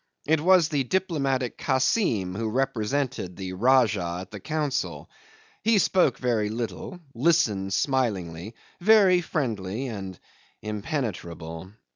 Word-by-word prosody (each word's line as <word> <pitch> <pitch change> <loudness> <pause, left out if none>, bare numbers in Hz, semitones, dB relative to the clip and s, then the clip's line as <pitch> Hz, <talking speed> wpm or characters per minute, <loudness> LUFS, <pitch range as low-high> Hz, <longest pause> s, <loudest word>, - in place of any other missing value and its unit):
It 155 0 +2
was 180 -1 +5
the 145 -3 0
diplomatic 140 -6 -1
Kassim 130 - +1
who 110 +3 -2
represented 125 -4 -1
the 95 -1 -6
Rajah 105 -6 +2
at 95 - -11
the 105 - -7
council. 150 +3 -3 0.5
He 225 0 +3
spoke 180 -9 +3
very 115 -4 0
little, 120 - -5
listened 115 - +2
smilingly, 105 - -1 0.2
very 190 -2 +5
friendly 120 - -3
and 95 -5 -7 0.4
impenetrable. 95 - -5
120 Hz, 110 wpm, -26 LUFS, 100-150 Hz, 0.5 s, was